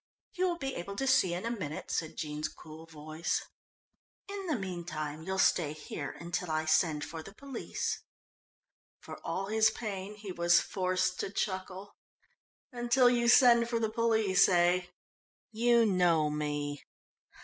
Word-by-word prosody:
"You 370 +1 +1
will 345 - -2
be 270 -4 -4
able 200 +3 -6
to 270 - -2
see 190 -10 +3
in 180 - -5
a 230 - -1
minute," 160 -10 -5
said 160 - -3
Jean's 150 0 -3
cool 160 +1 -12
voice. 155 +1 -3 0.8
"In 395 -1 -6
the 315 - +1
meantime 170 -6 -5
you'll 190 +3 -3
stay 165 -5 +3
here 150 -2 -6
until 170 +1 -3
I 155 0 0
send 155 -1 +2
for 160 0 -7
the 195 +5 -12
police." 275 -2 -4 1.0
For - - -9
all 195 - -2
his 220 +2 +3
pain 205 -3 -5
he 205 -2 -8
was 175 -1 +4
forced 185 -1 -1
to - - -2
chuckle. 190 0 -4 0.7
"Until 245 0 +3
you 240 -1 +1
send 235 -1 +6
for 235 -1 0
the 220 -1 -1
police, 220 -4 +3
eh? 180 0 +3 0.6
You 235 +1 +4
know 175 -6 +3
me?" 145 -1 -3
185 Hz, 150 wpm, -31 LUFS, 160-230 Hz, 1.0 s, send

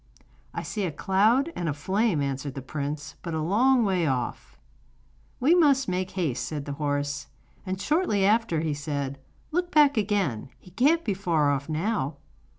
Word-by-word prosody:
'I - - -3
see 210 - -3
a 175 - -2
cloud 215 - +2
and 170 -2 -2
a 145 - -2
flame,' 190 +1 +1
answered 135 0 -3
the 135 - -6
prince; 145 +2 -5
'but 170 -2 -4
a - - -1
long 240 +7 +3
way 185 -5 +1
off.' 125 -3 -3 0.8
'We 275 +6 +4
must 285 -6 +4
make 185 0 -1
haste,' 150 -11 -2
said 145 -2 -4
the 145 - -4
horse. 145 0 -1 0.4
And 185 0 -2
shortly 295 - +1
after 210 -6 +2
he 160 -2 -1
said: 140 -2 -4 0.3
'Look 355 +2 0
back 290 -4 +5
again; 195 - 0
he 180 - -17
can't 290 - +3
be 205 - +1
far 165 -6 +1
off 140 +2 -2
now. 155 -3 -1
180 Hz, 170 wpm, -26 LUFS, 145-225 Hz, 0.8 s, back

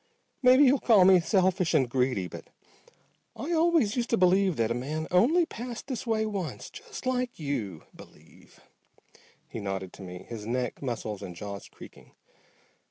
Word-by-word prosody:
Maybe 255 +2 +6
you'll 270 0 +5
call 210 -6 +5
me 185 -1 +7
selfish 185 -1 +1
and 130 - +3
greedy, 125 -6 0
but - - -10 0.9
I 305 - -5
always 325 -10 +3
used 240 -1 -1
to 230 - +2
believe 185 0 +3
that 115 -2 0
a - - +2
man 150 +6 -3
only 280 - +4
passed 240 -4 -7
this 260 -3 -5
way 220 -1 +1
once. 195 -6 -5
Just - - -10
like 250 -1 -1
you 115 - -4
believe," - - -18 0.9
he - - -7
nodded 95 -2 -4
to - - -12
me, 90 -1 -9
his 110 -3 -7
neck 125 0 -2
muscles 115 -6 -4
and 90 - -8
jaws 100 +1 -8
creaking. - - -15
180 Hz, 165 wpm, -28 LUFS, -, 0.9 s, me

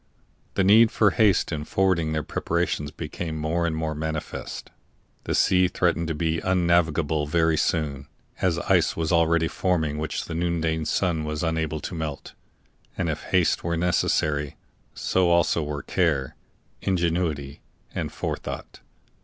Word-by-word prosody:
The 95 - +2
need 110 +4 +7
for 105 -2 +3
haste 105 -6 +3
in 75 -2 -3
forwarding 85 -1 +1
their 75 -1 -1
preparations 80 -3 -1
became 80 +2 -5
more 80 +2 0
and 80 - -1
more 80 0 -2
manifest; 80 0 -5 0.5
the - - -1
sea 90 -1 +4
threatened 85 -2 0
to 80 - -2
be 80 +1 -1
un 95 -1 +1
navigable 80 -3 +2
very 80 +1 +2
soon, 75 -3 -1 0.3
as 90 -3 +2
ice - - +2
was 80 0 -1
already 85 -1 +3
forming 80 -6 0
which 80 - -3
the 85 - -6
noonday 80 -2 -1
sun 85 -3 0
was 75 0 -3
unable 80 -1 -1
to - - -6
melt. 80 -4 -5 0.6
And - - 0
if - - -5
haste - - +2
were 85 0 -1
necessary, 75 -4 +1 0.4
so 95 -2 +1
also 85 -1 +3
were 75 -1 -4
care, 75 -8 0 0.5
ingenuity, 85 -6 -1 0.3
and - - -3
forethought. - - -5
80 Hz, 145 wpm, -25 LUFS, 75-85 Hz, 0.6 s, need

